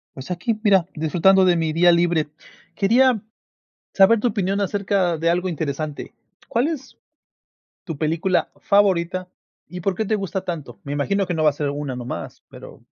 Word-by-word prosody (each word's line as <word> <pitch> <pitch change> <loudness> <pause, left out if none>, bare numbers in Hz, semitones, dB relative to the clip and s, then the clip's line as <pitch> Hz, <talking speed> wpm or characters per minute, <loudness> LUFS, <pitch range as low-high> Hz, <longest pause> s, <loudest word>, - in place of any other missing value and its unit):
Pues 130 +7 -8
aquí, 210 +5 -2
mira, 195 -5 +4
disfrutando 185 +5 +3
de 180 - +4
mi 160 -2 -1
día 175 +2 +5
libre. 170 -3 +1 0.5
Quería 235 +3 +3 0.7
saber 210 +3 +5
tu 245 - +2
opinión 200 -2 -1
acerca 195 -3 0
de 165 +1 +1
algo 180 +2 0
interesante, 155 -2 -4 0.3
¿cuál 245 +6 +1
es 295 -5 -7 0.9
tu 165 -5 -6
película 165 +4 0
favorita 185 -3 +2 0.4
y 180 +3 -8
por 195 +2 -1
qué 220 - -2
te 215 - 0
gusta 195 -2 -3
tanto? 145 - -6
Me 140 - -6
imagino 195 +8 0
que 175 - -2
no 160 -2 -1
va 150 - +6
a - - -13
ser 145 -1 -2
una 145 -2 -4
nomás, 125 0 -7
pero - - -13
180 Hz, 170 wpm, -22 LUFS, 160-200 Hz, 0.9 s, va